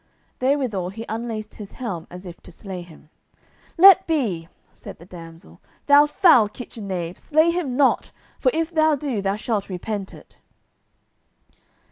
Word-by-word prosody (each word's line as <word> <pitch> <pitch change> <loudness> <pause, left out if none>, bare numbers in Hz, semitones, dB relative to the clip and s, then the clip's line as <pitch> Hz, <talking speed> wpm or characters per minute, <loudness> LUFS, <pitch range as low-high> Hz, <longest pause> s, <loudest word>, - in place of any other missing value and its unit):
Therewithal 255 -9 0
he 220 +4 -8
unlaced 220 -1 -5
his 205 -2 -10
helm 190 -10 -5
as 180 +2 -11
if 175 -1 -10
to - - -14
slay 185 +1 -8
him. 160 -2 -16 0.7
"Let 380 +1 +8
be," 220 - -1 0.3
said - - -11
the 170 - -15
damsel, 165 - -13 0.2
"thou 290 +1 +6
foul 295 - +5
kitchen 220 -2 -9
knave, 180 -2 -4
slay 315 +2 +2
him 315 -8 -3
not, 280 -2 +2 0.3
for - - +3
if 330 -5 -2
thou 315 -2 +3
do, 265 -7 -3
thou 195 0 0
shalt 215 -2 -3
repent 195 +2 -5
it." - - -18
215 Hz, 150 wpm, -22 LUFS, 180-290 Hz, 0.7 s, Let